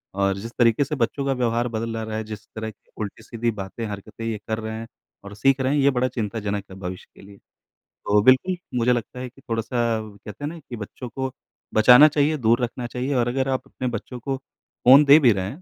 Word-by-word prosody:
और 100 -1 +1
जिस 115 +4 -7
तरीके 115 +2 +4
से 145 +2 -3
बच्चों 135 +2 -1
का 135 - +1
व्यवहार 120 -1 0
बदल 115 0 -3
आ 110 - -3
रहा 110 0 -4
है, 110 - -3
जिस 110 -1 -9
तरह 110 0 -4
की 105 - -32
उल्टी-सीधी 115 +3 -3
बातें, 105 +2 -6
हरकतें 105 +2 -7
ये 115 -1 -2
कर 110 0 -1
रहे 110 0 -5
हैं 115 - -7 0.4
और 100 0 -9
सीख 135 +6 +3
रहे 130 +1 +1
हैं, - - +2
ये 140 - +5
बड़ा 130 -1 +1
चिंताजनक 105 -4 -3
है - - -9
भविष्य 90 -1 -6
के - - -15
लिए। 100 0 -14 0.5
तो 105 0 0
बिल्कुल, 130 - +4 0.2
मुझे 120 +1 +3
लगता 120 +1 -4
है 125 0 -5
कि 135 - -21
थोड़ा-सा 115 -2 -1
कहते 105 +4 -11
हैं 145 - -1
ना 170 +1 -9
कि 130 -5 -9
बच्चों 115 +3 -8
को 130 +3 -4 0.4
बचाना 125 +6 +8
चाहिए, 150 +1 +1
दूर 120 -1 +2
रखना 120 0 -3
चाहिए 125 +4 -3
और 120 -1 +2
अगर 130 +2 0
आप 130 -1 0
अपने 130 - -5
बच्चों 120 +1 -5
को 135 +2 -3
फ़ोन 135 +1 +3
दे 145 +2 +8
भी 130 -6 +5
रहे 95 -2 -1
हैं 145 - -10
115 Hz, 235 wpm, -23 LUFS, 110-130 Hz, 0.5 s, बचाना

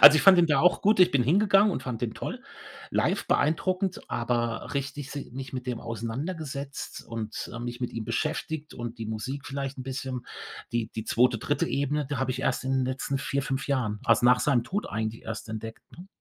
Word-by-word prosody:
Also, 150 +2 +12
ich - - +3
fand 190 -2 +8
den 170 - +6
da 150 - +3
auch 180 +1 +4
gut. 210 -1 +4
Ich 180 0 +7
bin 130 -6 +3
hingegangen 200 - +5
und - - -3
fand 120 -3 -4
den 120 -2 -2
toll. - - -5 0.5
Live - - +1
beeindruckend, 185 +5 +1
aber 120 -1 -1
richtig 140 0 -3
si 140 -3 -6
nicht 135 +1 -6
mit 130 0 -5
dem 120 -2 -2
auseinandergesetzt 140 - -4
und, 110 -2 -5
äh, 115 - -5
mich 120 +1 -5
mit 125 - -1
ihm 115 -2 -4
beschäftigt 155 +5 -2
und 120 -1 -6
die 110 - -4
Musik 130 +6 -4
vielleicht 140 -1 -3
'n - - -4
bisschen. 130 -1 -4 0.5
Die 120 -2 0
die 110 0 -3
2., 120 0 +3
3. 150 +7 0
Ebene, 145 +1 0
die 145 - 0
habe 130 -1 0
ich 130 +1 -2
erst 130 -1 0
in 130 - 0
den 130 -1 +2
letzten 135 +1 -1
4, 140 +1 -1
5 135 0 -2
Jahren, 120 -7 0
also, - - +4
nach 125 -2 +6
seinem 125 -5 +3
Tod 200 +9 -2
eigentlich 110 0 -3
erst 110 0 -5
entdeckt, 110 +1 -6
ne? 180 +2 -11
130 Hz, 215 wpm, -28 LUFS, 120-145 Hz, 0.5 s, Also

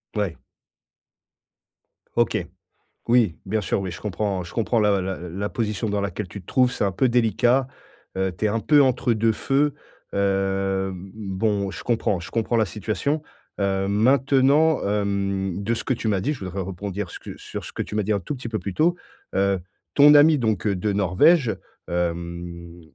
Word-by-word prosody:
Ouais. 100 -5 -1 1.8
OK. - - +2 0.7
Oui, 115 -8 +3
bien 110 +3 0
sûr. 100 - -1
Oui, 95 - -3
je 85 - -8
comprends. 100 -2 -2
Je 85 - -11
comprends 115 0 +1
la 105 -2 +3
la 95 0 -3
la 90 +4 -4
position 110 -1 -2
dans 100 0 0
laquelle 100 0 -3
tu 100 - -8
te 90 - -21
trouves, 125 -1 +3
c'est - - -1
un 100 - 0
peu 130 +7 +2
délicat. 120 +2 +2 0.5
Heu, 95 -1 0
tu 110 - 0
es - - +2
un 115 +2 0
peu 145 +4 +5
entre 125 -2 +2
deux 110 +1 +2
feux. 140 +5 +1 0.4
Hem, 95 -1 -1
bon, 100 -1 -1
je - - -8
comprends, 110 -6 0
je 85 - -9
comprends 115 +1 0
la 110 - +4
situation. 110 +9 -2 0.4
Heu, 95 0 0
maintenant, 135 +7 +4
hem, 100 -2 -1
de 115 +3 0
ce - - -5
que - - 0
tu 115 - -3
m'as 100 -3 +1
dit, 140 +10 0
je 120 -10 -7
voudrais 95 +1 -4
rebondir 95 +1 -5
ce - - -8
que - - -9
sur - - -7
ce - - -9
que - - -3
tu - - -8
m'as 105 -1 0
dit 110 - 0
un 100 - 0
tout 95 - -4
petit 120 -2 -6
peu 110 - -2
plus 95 0 -5
tôt. 175 +3 +2 0.4
Heu, 100 0 +2 0.4
ton 145 +1 +8
ami 150 +1 +7
donc, 110 -5 0
heu, 100 - +2
de 100 +3 -1
Norvège, 105 - +4 0.3
hem, 85 0 -4
105 Hz, 190 wpm, -23 LUFS, 95-120 Hz, 1.8 s, ton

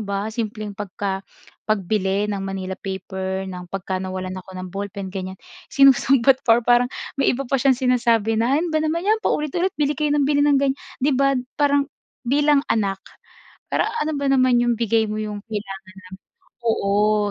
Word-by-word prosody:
ba 200 +2 -2
simpleng 215 -2 -4
pagka 195 -1 -3 0.5
pagbili 205 0 0
ng 200 - -2
manila 190 -1 -5
paper, 190 0 -4
ng 180 -1 -7
pagka 190 0 -3
nawalan 185 0 -5
ako 185 0 -12
ng 185 -1 -6
ballpen 200 0 -5
ganyan, 190 -1 -5 0.3
sinusumbat 270 -2 +5
pa 230 +1 +5
parang 245 +1 +4 0.3
may 275 - +2
iba 275 - -3
pa 270 +1 0
siyang 265 +1 +4
sinasabi 235 -4 +2
na, 240 +4 +2
"Ano 330 +3 0
ba 310 - +1
naman 315 +2 -1
'yan 430 +2 +2
paulit-ulit. 345 0 -1
Bili 295 0 0
kayo 300 -1 +1
ng 290 - +2
bili 285 0 +3
ng 280 -1 +3
ganyan," 270 0 +1 0.2
'di 290 - +3
ba? 275 0 +3 0.2
Parang 285 0 +2 0.3
bilang 285 +3 +3
anak 195 -3 0 0.7
para - - +1 0.2
ano 305 -1 -2
ba 280 - -1
naman 255 -2 +4
'yong 240 0 +2
bigay 225 -1 +1
mo 215 0 -3
'yong 210 -1 -4
kailangan 195 -3 -5 0.6
ng. - - -34
Oo, 210 -1 +2
225 Hz, 175 wpm, -22 LUFS, 195-275 Hz, 0.7 s, sinusumbat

